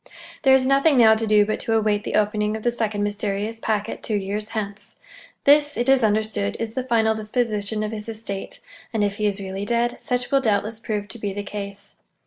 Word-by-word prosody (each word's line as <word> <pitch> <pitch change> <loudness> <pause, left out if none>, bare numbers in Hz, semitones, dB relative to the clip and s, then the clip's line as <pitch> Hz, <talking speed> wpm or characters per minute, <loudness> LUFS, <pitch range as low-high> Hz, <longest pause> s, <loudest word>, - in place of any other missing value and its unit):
There 265 -1 +6
is 260 -1 +3
nothing 275 +2 +4
now 225 -2 +7
to 220 0 0
do 210 -1 +5
but 215 - -2
to 225 - 0
await 210 -1 +1
the - - -2
opening 210 0 +1
of 220 - -10
the 240 - +2
second 215 -3 -1
mysterious 205 +1 -2
packet 215 -2 -2
two 215 - -2
years 205 +2 -3
hence. 210 -2 -6 0.5
This, 290 +1 +4
it 240 - 0
is 270 -1 +5
understood, 215 - 0
is 225 -1 -3
the 260 +1 -2
final 225 -3 +2
disposition 215 -1 -2
of 215 - -3
his 215 0 -6
estate; 215 -3 -6 0.3
and 220 -2 +1
if 205 0 -1
he 210 - +1
is 205 0 -2
really 195 0 -5
dead, 235 +3 0
such 245 0 -2
will 275 -1 +4
doubtless 215 -1 0
prove 210 -2 -3
to 235 - -8
be 205 -2 -3
the 205 +1 -4
case. 200 -1 -7
215 Hz, 215 wpm, -23 LUFS, 205-230 Hz, 0.5 s, now